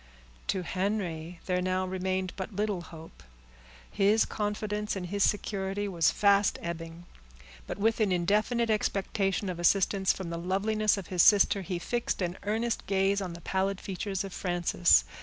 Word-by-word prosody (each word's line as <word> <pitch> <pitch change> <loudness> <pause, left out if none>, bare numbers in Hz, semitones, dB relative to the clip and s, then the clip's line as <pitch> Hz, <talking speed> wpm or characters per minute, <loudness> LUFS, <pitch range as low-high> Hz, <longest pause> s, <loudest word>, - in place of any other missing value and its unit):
To 190 -2 0
Henry 180 -3 -3
there 180 -1 0
now 185 0 0
remained 185 0 -2
but 195 +2 -6
little 205 -3 -1
hope; 160 -1 -12 0.7
his 205 +3 +3
confidence 210 0 -2
in 190 - -4
his 200 +3 -1
security 200 -1 -1
was 170 -5 +2
fast 200 -1 +3
ebbing, 165 0 -6 0.6
but - - -5
with 225 +3 +1
an 210 -3 +2
indefinite 210 +6 +1
expectation 195 -1 0
of 180 -2 -4
assistance 190 +2 +3
from 185 -3 -5
the 170 - -3
loveliness 210 +4 +1
of 195 - -5
his 180 - +4
sister, 200 0 +5
he 185 -1 -3
fixed 235 +7 -2
an 175 0 -2
earnest 220 +3 -2
gaze 195 +1 +2
on 180 -3 -4
the 170 - -10
pallid 190 +1 -1
features 195 0 -3
of 195 -2 -7
Frances. 175 -1 +3
195 Hz, 160 wpm, -29 LUFS, 180-205 Hz, 0.7 s, sister